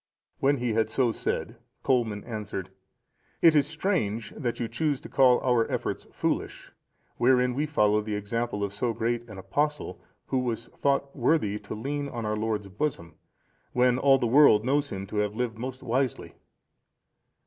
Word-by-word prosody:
When 140 +1 +3
he 120 -2 -1
had 110 0 +1
so 120 +1 +2
said, - - -3 0.3
Colman 115 -6 +1
answered, 105 -5 -5 0.7
"It 165 - +6
is 145 -2 +3
strange 150 - -1
that 120 -5 -3
you 120 - -1
choose 150 +1 -1
to 170 - -10
call 125 -2 +5
our 125 -3 +2
efforts - - -3
foolish, - - -3 0.5
wherein 125 0 +3
we 145 +4 -1
follow 105 -7 +3
the 105 0 -3
example 105 +1 -2
of 100 -1 -3
so 115 +3 -1
great 120 +1 -2
an 105 - -9
Apostle, 145 +11 -2 0.2
who 130 - 0
was 115 -2 -3
thought 140 0 -1
worthy 120 -6 +1
to - - -7
lean 140 +5 -3
on 115 -4 -5
our 105 0 0
Lord's 105 -2 -2
bosom, 95 - -3 0.6
when 125 0 +3
all 135 0 +5
the 125 - -1
world 120 -3 +6
knows 145 +2 +1
him 95 0 -5
to 105 - -6
have 105 0 0
lived 115 -2 -2
most 130 +2 -6
wisely." 130 +1 -1
120 Hz, 170 wpm, -27 LUFS, 105-135 Hz, 0.7 s, It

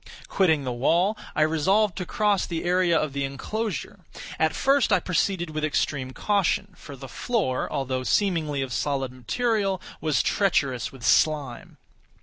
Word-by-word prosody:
Quitting 160 -7 +2
the 130 - -3
wall, 170 - +2 0.2
I 150 - +3
resolved 180 +6 +2
to 180 - -4
cross 210 -4 +1
the 165 -2 -3
area 175 -1 +2
of 155 -3 -1
the 140 0 -2
enclosure. 200 +8 -4 0.4
At 160 0 +2
first 275 0 +2
I - - +5
proceeded 180 -2 -1
with 155 0 -4
extreme 145 -3 -1
caution, 200 +5 0
for 145 - -11
the 135 0 -10
floor, 130 - -1
although 130 -1 -2
seemingly 155 -3 0
of 130 -2 -5
solid 135 -3 -1
material, 195 - -1 0.2
was 155 -6 +1
treacherous 140 - +1
with 130 -4 -9
slime. 145 -6 +1
160 Hz, 150 wpm, -25 LUFS, 135-195 Hz, 0.4 s, I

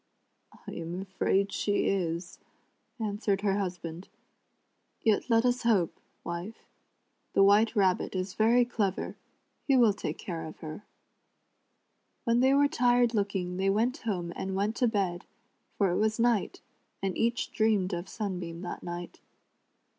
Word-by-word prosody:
" - - -24
I - - -5
am 170 +2 -5
afraid 195 +1 0
she 205 -1 +1
is," 175 -2 -1 0.6
answered 205 -2 -1
her 200 -1 +1
husband; 175 -2 -5 0.5
" - - -45
yet 220 +2 +2
let 230 +1 +4
us 245 0 +2
hope, 210 -8 +2 0.2
wife. 175 +6 -6 0.7
The 195 - +5
White 210 +4 +5
Rabbit 190 -2 +2
is 185 0 -2
very 235 +3 +4
clever; 205 -6 -2 0.5
he 275 -2 +5
will 230 -4 +5
take - - -4
care 165 -3 -5
of 155 - -10
her." 155 +6 -7 1.4
When 235 0 +2
they 265 +2 +5
were 285 0 +5
tired 245 -4 +3
looking 195 -4 -1
they 195 +1 +1
went 230 +7 +1
home 180 - -3
and 190 0 -3
went 205 +3 0
to 245 - +3
bed, 195 -6 -1 0.5
for 195 -3 +3
it 175 - 0
was 215 +1 +1
night, 235 -3 +1 0.4
and 190 -2 -1
each 235 +1 0
dreamed 210 -4 +2
of 175 +2 -4
Sunbeam 180 -5 -4
that 175 - -5
night. 175 0 -7
200 Hz, 150 wpm, -29 LUFS, 180-225 Hz, 1.4 s, The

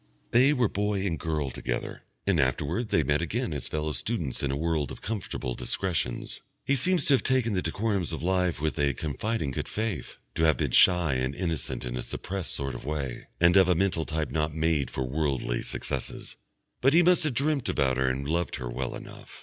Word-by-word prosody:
They 130 +4 +6
were 125 -6 +3
boy 100 -1 -1
and 85 -5 -1
girl 75 -5 -1
together, - - -4 0.2
and 100 -5 +2
afterwards 75 - 0
they 80 - +3
met 75 +2 +1
again 110 +4 -2
as 70 - -4
fellow 75 0 -2
students 75 - -2
in 70 - 0
a 70 - -1
world 80 -2 0
of - - -8
comfortable 95 - -3
discretions. 85 -5 -2 0.2
He 140 - +3
seems 175 +4 +2
to 145 - +4
have 135 - +4
taken 130 -4 +2
the 90 - +1
decorums 95 0 -1
of 80 - -4
life 90 -3 +1
with 75 -3 -1
a 70 -2 +2
confiding 80 - -2
good - - -3
faith, 110 - -3 0.2
to - - -2
have 80 - +4
been 75 -5 -1
shy 90 0 +5
and 65 +1 -1
innocent 85 -6 -2
in 60 0 -4
a 60 - -2
suppressed 95 +8 -4
sort 70 -2 -3
of - - -7
way, 70 -4 -4
and 85 +1 +5
of 95 -1 +6
a 90 - +4
mental 90 -3 +1
type 80 -1 -2
not 75 -1 -1
made 80 -3 +1
for 65 - -3
worldly 65 -3 -1
successes; - - -3 0.5
but 135 +3 +4
he 175 +2 +6
must 180 0 +5
have 150 -5 0
dreamt 140 0 +1
about 65 -3 +1
her 65 0 +2
and 70 +2 -2
loved 85 +2 0
her 60 -2 -5
well - - -3
enough. - - -11
80 Hz, 210 wpm, -28 LUFS, 70-100 Hz, 0.5 s, They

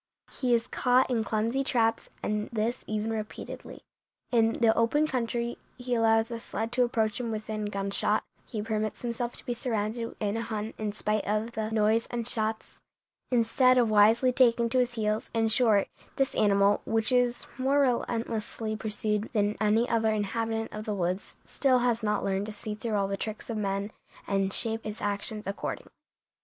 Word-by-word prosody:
He 250 -3 +1
is 230 0 0
caught 250 +1 +2
in 230 -3 +1
clumsy 230 +5 0
traps, 230 -4 +1
and 210 0 -1
this 230 +2 -1
even 215 +1 -2
repeatedly. 215 -1 -6 0.5
In 225 -2 +3
the 225 -2 +3
open 230 +7 +3
country 240 -3 -2 0.2
he 250 0 -3
allows 225 0 +3
a 230 - -4
sled 225 0 -4
to 250 0 +3
approach 220 -3 0
him 240 -2 -3
within 215 -1 -3
gunshot; 200 +1 0 0.2
he 215 -4 -4
permits 215 0 -2
himself 240 0 -3
to - - -13
be 245 - -1
surrounded 230 -1 -2
in 210 +1 -1
a - - -1
hunt 220 -1 -4
in 215 -1 -1
spite 215 0 -1
of 215 +3 0
the 220 -2 -3
noise 220 +1 +2
and 235 -1 -3
shots, 220 -2 -2 0.5
instead 255 +1 +4
of 235 -3 +3
wisely 220 +5 +5
taking 235 -2 +4
to 255 +2 +2
his 245 -1 +1
heels; 215 -1 -1
in 225 -1 +2
short, 220 -4 +4 0.3
this 270 -1 +1
animal, 200 -1 +3
which 225 +2 +1
is 245 -1 +2
more 275 +2 +3
relentlessly 230 -3 -1
pursued 210 0 -1
than 210 -1 +1
any 220 +3 +3
other 225 -2 +2
inhabitant 225 +2 -2
of 215 0 -6
the 210 - -2
woods, 185 +1 -2
still 265 -2 +2
has 235 -2 +1
not 210 -1 0
learned 195 +1 -1
to - - -4
see 210 0 -5
through 215 +1 -3
all 200 -1 +1
the 195 0 -2
tricks 215 +2 -5
of 225 - -3
men 200 0 -2 0.3
and 195 -1 0
shape 225 +2 0
his 215 0 -5
actions 205 +1 -3
accordingly." 195 +1 -5
225 Hz, 180 wpm, -28 LUFS, 210-235 Hz, 0.5 s, wisely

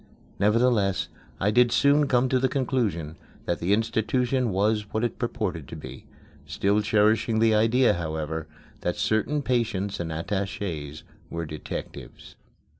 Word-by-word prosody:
Nevertheless, 105 -1 +2 0.3
I 105 - +2
did 120 +1 +4
soon 145 +3 +4
come 125 0 +3
to 130 - +2
the 130 0 +1
conclusion 110 - -1 0.3
that 85 - -1
the 90 - -1
institution 115 +4 +1
was 105 +2 0
what 110 - -1
it 120 - -2
purported 95 - -3
to - - -8
be - - -10 0.4
still 100 +2 +1
cherishing 110 +1 +2
the 110 0 +4
idea, 115 +4 +4
however, 80 -1 -4 0.3
that - - -2
certain 140 +7 0
patients 115 -6 -1
and 85 -1 -3
attachés 80 -3 -4 0.3
were 85 0 -4
detectives. 75 -1 -8
105 Hz, 135 wpm, -26 LUFS, 90-120 Hz, 0.4 s, did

